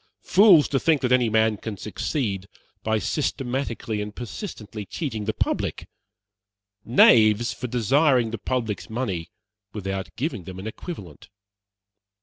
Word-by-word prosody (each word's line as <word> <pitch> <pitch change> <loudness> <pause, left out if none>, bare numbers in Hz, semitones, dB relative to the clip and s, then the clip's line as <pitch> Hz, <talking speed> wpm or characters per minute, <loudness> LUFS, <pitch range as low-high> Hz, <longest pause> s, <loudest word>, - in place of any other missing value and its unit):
Fools, 190 -6 +6
to 135 - +1
think 160 -1 +2
that 125 - 0
any 125 -2 +4
man 110 0 +2
can 110 0 -6
succeed 105 - -3 0.3
by 110 0 0
systematically 120 -4 -2
and 105 0 -6
persistently 115 - -7
cheating 110 - -4
the 110 - 0
public. - - -2 1.0
Knaves, 115 -1 +5
for 125 - -5
desiring 125 +1 +2
the 115 - -4
public's 115 -3 -3
money 100 -8 -3 0.4
without 95 -2 -4
giving 125 - -3
them 95 +1 -8
an 95 - -7
equivalent. 110 - -8
110 Hz, 130 wpm, -24 LUFS, 105-130 Hz, 1.0 s, Fools